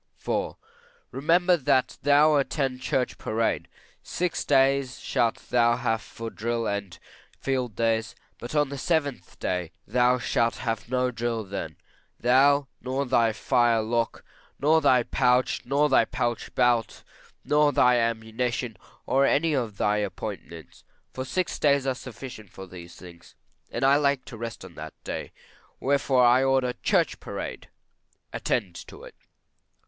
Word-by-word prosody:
IV. -, -, -2 dB, 0.6 s
Remember 175 Hz, +5 st, +3 dB
that 130 Hz, -4 st, +1 dB
thou 145 Hz, +1 st, +5 dB
attend 135 Hz, -2 st, -1 dB
church 130 Hz, -1 st, -1 dB
parade. 110 Hz, +1 st, -1 dB, 0.3 s
Six 175 Hz, 0 st, -2 dB
days 135 Hz, -1 st, +2 dB
shalt 115 Hz, -1 st, 0 dB, 0.2 s
thou 120 Hz, -1 st, +4 dB
have 115 Hz, -3 st, -1 dB
for 115 Hz, -1 st, -8 dB
drill 115 Hz, +1 st, -2 dB
and 100 Hz, -4 st, -3 dB, 0.4 s
field 130 Hz, -5 st, -2 dB
days; 115 Hz, +1 st, 0 dB, 0.2 s
but 120 Hz, +6 st, -7 dB
on 150 Hz, -2 st, +2 dB
the 140 Hz, -1 st, -6 dB
seventh 145 Hz, -5 st, -2 dB
day 90 Hz, -3 st, -2 dB
thou 125 Hz, +3 st, +3 dB
shalt 115 Hz, 0 st, 0 dB
have 115 Hz, -2 st, -4 dB
no 125 Hz, 0 st, +1 dB
drill, 115 Hz, -1 st, -2 dB, 0.8 s
thou, 140 Hz, +3 st, +4 dB
nor 130 Hz, +3 st, -2 dB
thy 120 Hz, -3 st, +3 dB
fire 115 Hz, +2 st, +2 dB
lock, 115 Hz, +1 st, -2 dB, 0.3 s
nor 155 Hz, +3 st, +4 dB
thy 130 Hz, -4 st, +4 dB
pouch, 125 Hz, 0 st, +1 dB
nor 140 Hz, +4 st, +2 dB
thy 130 Hz, -5 st, +4 dB
pouch 120 Hz, 0 st, -3 dB
belt, 120 Hz, -2 st, +1 dB, 0.4 s
nor 150 Hz, 0 st, +3 dB
thy 125 Hz, -2 st, +4 dB
ammunition, 115 Hz, +1 st, -2 dB, 0.3 s
or 135 Hz, +1 st, +3 dB
any 160 Hz, +2 st, +2 dB
of 115 Hz, -7 st, -2 dB
thy 105 Hz, +2 st, +1 dB
appointments: 85 Hz, -6 st, -6 dB, 0.3 s
for 130 Hz, -, -4 dB
six 180 Hz, +7 st, -2 dB
days 140 Hz, -2 st, +3 dB
are 135 Hz, -, +1 dB
sufficient 125 Hz, -4 st, -10 dB
for 95 Hz, +2 st, -10 dB
these 85 Hz, -2 st, -11 dB
things, 85 Hz, -2 st, -14 dB, 0.3 s
and 120 Hz, -, -4 dB
I 135 Hz, +1 st, +5 dB
like 140 Hz, -2 st, +1 dB
to 130 Hz, -4 st, -9 dB
rest 115 Hz, 0 st, -6 dB
on -, -, -12 dB
that -, -, -9 dB
day; -, -, -5 dB, 0.5 s
wherefore 135 Hz, -2 st, +2 dB
I 125 Hz, +2 st, +5 dB
order 135 Hz, -2 st, +2 dB
church -, -, 0 dB
parade -, -, -7 dB, 0.6 s
attend 100 Hz, -7 st, -1 dB
to -, -, -12 dB
it. -, -, -11 dB
125 Hz, 145 wpm, -26 LUFS, 115-135 Hz, 0.8 s, thou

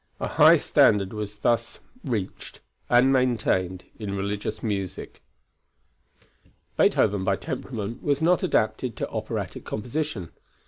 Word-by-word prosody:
A -, -, -2 dB
high -, -, +7 dB
standard 100 Hz, -1 st, +3 dB
was 105 Hz, -1 st, -5 dB
thus 115 Hz, +2 st, 0 dB, 0.3 s
reached 110 Hz, -8 st, -4 dB, 0.3 s
and 125 Hz, +2 st, +5 dB
maintained 105 Hz, -8 st, +1 dB, 0.2 s
in 100 Hz, -2 st, -4 dB
religious 100 Hz, +2 st, -3 dB
music. 100 Hz, -4 st, -4 dB, 1.5 s
Beethoven 100 Hz, -1 st, +3 dB
by 95 Hz, +1 st, +2 dB
temperament 115 Hz, +2 st, -5 dB
was 145 Hz, -1 st, +1 dB
not 175 Hz, +3 st, +3 dB
adapted 115 Hz, -, 0 dB
to -, -, -3 dB
operatic -, -, -4 dB
composition. 120 Hz, -, -4 dB
110 Hz, 110 wpm, -25 LUFS, 100-125 Hz, 1.5 s, high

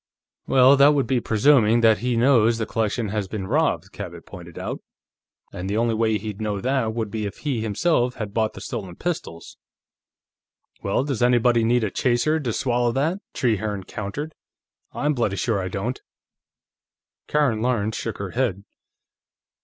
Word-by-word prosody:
"Well, 130 Hz, +1 st, +6 dB
that 145 Hz, +2 st, +6 dB
would 140 Hz, -, +1 dB
be 130 Hz, -2 st, +1 dB
presuming 115 Hz, 0 st, +4 dB
that 110 Hz, -2 st, +5 dB
he 125 Hz, 0 st, -1 dB
knows 115 Hz, -2 st, +4 dB
the 110 Hz, -, -2 dB
collection 110 Hz, 0 st, -1 dB
has 105 Hz, -1 st, -2 dB
been 95 Hz, 0 st, -5 dB
robbed," -, -, 0 dB
Cabot -, -, -8 dB
pointed 85 Hz, -2 st, -11 dB
out. -, -, -5 dB, 0.7 s
"And 90 Hz, +2 st, -5 dB
the 105 Hz, -, -1 dB
only 115 Hz, 0 st, +1 dB
way 110 Hz, -1 st, +1 dB
he'd 105 Hz, -1 st, -6 dB
know 105 Hz, -2 st, -2 dB
that 125 Hz, -1 st, 0 dB
would 110 Hz, -3 st, -3 dB
be 110 Hz, -2 st, -2 dB
if 100 Hz, -, -9 dB
he, 135 Hz, -7 st, -2 dB
himself, 120 Hz, -, +1 dB
had 105 Hz, -3 st, -5 dB
bought 110 Hz, -1 st, 0 dB
the -, -, -10 dB
stolen 100 Hz, -9 st, -6 dB
pistols." 150 Hz, -, -5 dB, 1.2 s
"Well, 100 Hz, +6 st, 0 dB
does 135 Hz, -5 st, -3 dB
anybody 120 Hz, -1 st, +3 dB
need 120 Hz, +1 st, +2 dB
a 105 Hz, -, -1 dB
chaser 130 Hz, +8 st, +1 dB
to 130 Hz, -6 st, -2 dB
swallow 120 Hz, 0 st, 0 dB
that?" 160 Hz, +9 st, 0 dB, 0.2 s
Trehearne 105 Hz, -4 st, -1 dB
countered. 120 Hz, +11 st, -6 dB, 0.6 s
"I'm 150 Hz, +1 st, 0 dB
bloody 115 Hz, -7 st, 0 dB
sure 105 Hz, 0 st, 0 dB
I 95 Hz, -, -3 dB
don't." 105 Hz, +7 st, -4 dB, 1.3 s
Karen 140 Hz, -8 st, +1 dB
Lawrence 110 Hz, -3 st, 0 dB
shook 115 Hz, -, -4 dB
her 100 Hz, -2 st, -5 dB
head. 115 Hz, -6 st, -1 dB
115 Hz, 165 wpm, -23 LUFS, 105-125 Hz, 1.3 s, Well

